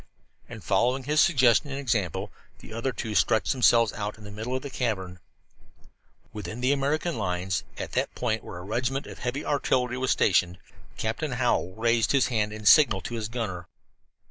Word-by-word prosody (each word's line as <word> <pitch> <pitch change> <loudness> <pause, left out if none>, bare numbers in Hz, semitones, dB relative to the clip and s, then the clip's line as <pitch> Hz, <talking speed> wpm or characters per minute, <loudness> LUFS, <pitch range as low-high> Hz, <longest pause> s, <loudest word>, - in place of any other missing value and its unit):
And - - -9
following 130 +2 +1
his 150 +3 +3
suggestion 130 -2 +4
and 135 0 -4
example, 110 - -1 0.3
the - - -12
other 115 +4 -2
two 110 -3 -5
stretched 105 +3 +2
themselves 115 -4 +4
out 105 0 -4
in 110 - -14
the 105 - -9
middle 110 +5 -4
of 130 - -3
the 140 - -6
cavern. 95 -8 -3 1.1
Within 105 +1 -6
the 130 +2 +2
American 145 +2 0
lines, 90 -1 -1
at - - -5
that - - -1
point 110 -3 -1
where - - -8
a 90 - -8
regiment 125 +7 -2
of - - -10
heavy 125 +4 -3
artillery 125 -3 0
was 130 0 -1
stationed, 90 -2 +2 0.4
Captain 120 +6 -2
Hallowell 120 -7 0
raised 115 +1 +2
his 135 -2 +3
hand 105 -4 0
in 110 0 -8
signal 140 -7 +6
to 120 - -6
his 110 -2 -3
gunner. 100 -8 -4
115 Hz, 180 wpm, -26 LUFS, 105-130 Hz, 1.1 s, signal